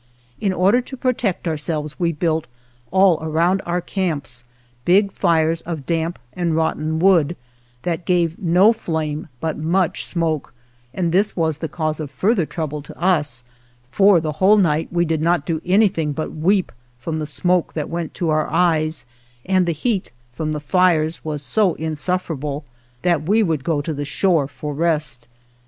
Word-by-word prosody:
In 200 - +1
order 195 +7 +3
to 265 +2 -9
protect 245 -8 -1
ourselves 155 -1 -2
we 170 -2 +2
built, 160 0 -1 0.4
all 190 -3 +4
around 165 +4 +1
our 175 +1 0
camps, 155 -10 -3 0.4
big 195 +6 +4
fires 165 -1 +1
of 160 -5 -6
damp 165 0 -1 0.2
and 170 -3 -1
rotten 160 -1 0
wood, 175 -2 +4 0.5
that 170 0 -2
gave 175 -3 +1
no 185 +4 +5
flame 160 -8 -3
but 160 +1 -3
much 170 +3 0
smoke, 160 -7 -2 0.4
and 170 +3 -1
this 200 +4 +2
was 160 -3 0
the 160 - -4
cause 155 -2 -2
of 150 -2 -4
further 185 - +1
trouble 150 -3 -4
to 140 - -13
us, 150 -9 +2 0.5
for 195 +6 +5
the 155 -1 -2
whole 205 +3 +6
night 165 -5 +2
we 175 0 +1
did 160 -1 -1
not 170 -2 +1
do 160 -1 -2
anything 180 -6 +2
but 155 +1 -4
weep 185 +5 +1 0.3
from 155 +6 -4
the 155 - -3
smoke 175 +3 +1
that 150 -2 -3
went 170 -1 -4
to 170 -3 0
our 155 0 +1
eyes, 155 -6 +1 0.4
and 185 -1 +2
the - - +2
heat 195 +5 -2 0.2
from 155 +3 -3
the 150 - -2
fires 165 0 +2
was 150 -2 -4
so 180 - +2
insufferable 155 -2 -3 0.4
that 170 -2 +1
we 220 +2 +4
would 160 -7 -1
go 155 -2 0
to 155 +2 -3
the 145 0 -4
shore 160 -1 +1
for 145 +2 -6
rest. 150 -6 -1
165 Hz, 170 wpm, -20 LUFS, 155-180 Hz, 0.5 s, whole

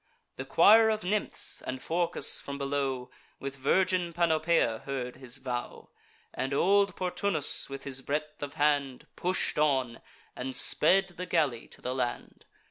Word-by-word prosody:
The - - -5
choir 220 +1 +6
of 215 -1 -1
nymphs, 205 +3 -1
and 130 0 -5
Phorcus, 170 +4 +1
from 140 0 -6
below, 135 -2 -2 0.3
With 135 0 -6
virgin 180 +5 +1
Panopea, 160 -8 +1
heard 125 -3 -4
his 130 -1 -4
vow; 125 -2 -6 0.4
And 135 +2 -2
old 200 +3 +3
Portunus, 180 -6 +1
with 135 0 -7
his 135 -1 -3
breadth 150 +3 -4
of 145 -1 -6
hand, 145 -3 0
Push'd 180 -3 0
on, 130 -6 +1 0.3
and 130 +1 -5
sped 190 +9 +4
the 180 +1 -5
galley 150 -9 0
to - - -13
the 125 - -3
land. 125 -2 -4
145 Hz, 145 wpm, -29 LUFS, 130-175 Hz, 0.4 s, choir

